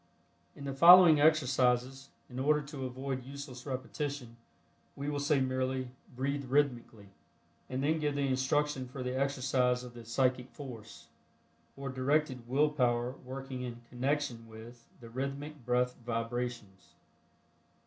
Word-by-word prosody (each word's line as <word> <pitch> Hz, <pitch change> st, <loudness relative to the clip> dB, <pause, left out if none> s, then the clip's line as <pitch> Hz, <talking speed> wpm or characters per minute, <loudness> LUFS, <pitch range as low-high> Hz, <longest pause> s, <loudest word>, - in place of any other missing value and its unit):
In -, -, -10 dB
the 140 Hz, -1 st, -3 dB
following 170 Hz, +1 st, +9 dB
exercises, 135 Hz, -3 st, +2 dB, 0.2 s
in 125 Hz, 0 st, -7 dB
order 150 Hz, +3 st, +3 dB
to 140 Hz, -2 st, -5 dB
avoid 130 Hz, 0 st, -4 dB
useless 135 Hz, -1 st, -9 dB
repetition, 130 Hz, -1 st, -4 dB, 0.6 s
we 140 Hz, +1 st, -4 dB
will 145 Hz, -1 st, -2 dB
say 145 Hz, 0 st, +2 dB
merely, 130 Hz, 0 st, -1 dB, 0.3 s
"Breathe 140 Hz, +2 st, -2 dB
Rhythmically," 125 Hz, -6 st, 0 dB, 0.6 s
and 130 Hz, +1 st, -2 dB
then 160 Hz, +2 st, +2 dB
give 150 Hz, -1 st, -1 dB
the 140 Hz, -1 st, +1 dB
instruction 135 Hz, +1 st, 0 dB
for 130 Hz, +1 st, -6 dB
the 125 Hz, 0 st, -3 dB
exercise 130 Hz, -2 st, +1 dB
of 125 Hz, -1 st, -10 dB
the 120 Hz, -1 st, -10 dB
psychic 125 Hz, +2 st, 0 dB
force, 110 Hz, -, -10 dB, 0.7 s
or 135 Hz, 0 st, -5 dB
directed 130 Hz, -1 st, 0 dB
Will 145 Hz, +4 st, +3 dB
power 120 Hz, -4 st, +1 dB
working 130 Hz, 0 st, -6 dB
in 120 Hz, -1 st, -6 dB
connection 125 Hz, -2 st, -2 dB
with 115 Hz, +2 st, -12 dB
the 115 Hz, -, -10 dB
rhythmic 140 Hz, +2 st, -5 dB
breath 125 Hz, 0 st, +2 dB
vibrations. 115 Hz, -4 st, -4 dB
130 Hz, 135 wpm, -32 LUFS, 125-140 Hz, 0.7 s, following